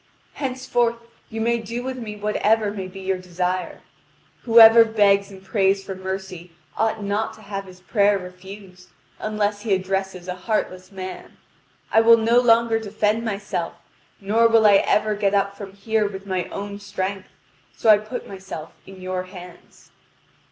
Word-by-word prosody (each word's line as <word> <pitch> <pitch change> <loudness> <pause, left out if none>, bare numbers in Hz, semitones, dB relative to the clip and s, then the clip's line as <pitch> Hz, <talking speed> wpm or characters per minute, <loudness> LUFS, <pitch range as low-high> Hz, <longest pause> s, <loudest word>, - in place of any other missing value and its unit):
Henceforth 255 -3 -1 0.3
you 225 - -6
may 235 +1 +1
do 230 +2 -5
with 260 0 -5
me 215 -3 -6
whatever 210 +1 +1
may 195 -2 -5
be 190 +1 -10
your 190 0 -1
desire. 180 0 -3 0.6
Whoever 230 -1 +9
begs 205 -3 +2
and 190 -1 -13
prays 195 -1 +1
for 195 0 -6
mercy, 190 -2 -6 0.2
ought 220 -1 -1
not 205 +2 -2
to 220 - -17
have 200 -1 -5
his 185 -1 -14
prayer 205 +1 +2
refused, 185 0 -12 0.3
unless 210 -1 -1
he 205 -3 +1
addresses 190 -1 -3
a 180 - -2
heartless 185 -1 -3
man. 185 -1 -8 0.5
I 225 - +5
will 230 0 +7
no 230 +2 +3
longer 230 -2 +3
defend 215 +1 -1
myself, 200 -5 -3 0.5
nor 220 +4 +3
will 225 -1 +4
I 205 -1 +7
ever 215 +2 +1
get 205 -1 0
up 200 0 0
from 200 -1 -9
here 215 +1 0
with 195 -1 -8
my 185 -2 -2
own 200 0 -7
strength; 195 -1 -4 0.5
so - - -3
I 215 -1 +8
put 215 +4 -7
myself 190 -5 -8 0.2
in 190 -1 -12
your 185 0 -3
hands." 180 -2 -14
200 Hz, 160 wpm, -22 LUFS, 190-220 Hz, 0.6 s, Whoever